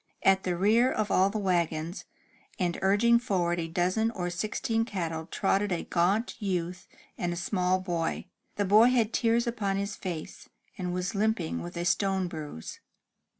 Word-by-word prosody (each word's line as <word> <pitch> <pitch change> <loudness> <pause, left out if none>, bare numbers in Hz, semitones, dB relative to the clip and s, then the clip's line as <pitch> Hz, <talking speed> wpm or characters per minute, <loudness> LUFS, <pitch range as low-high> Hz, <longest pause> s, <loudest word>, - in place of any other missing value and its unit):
At 195 0 +5
the 180 -2 -2
rear 225 +7 +4
of 215 -1 -1
all 190 +1 +4
the 210 - -3
wagons, 170 -3 -1 0.5
and 175 -2 -1
urging 215 +5 +4
forward 180 -8 0
a 165 - -2
dozen 185 +7 +1
or 180 -6 -3
sixteen 220 +4 -1
cattle, 165 -7 -4
trotted 195 +1 0
a 175 - -1
gaunt 195 +8 0
youth 180 -2 -2 0.3
and 175 -1 -1
a - - -2
small 180 +1 0
boy. 170 -3 -2 0.3
The 205 - 0
boy 210 +5 +6
had 235 -3 +1
tears 235 0 +2
upon 210 -5 -1
his 200 +1 -3
face, 170 -5 -7 0.3
and 180 -1 -3
was 180 +1 -2
limping 205 -5 0
with 175 0 -7
a 170 - -2
stone 190 0 +1
bruise. 150 - -7
190 Hz, 165 wpm, -28 LUFS, 175-210 Hz, 0.5 s, boy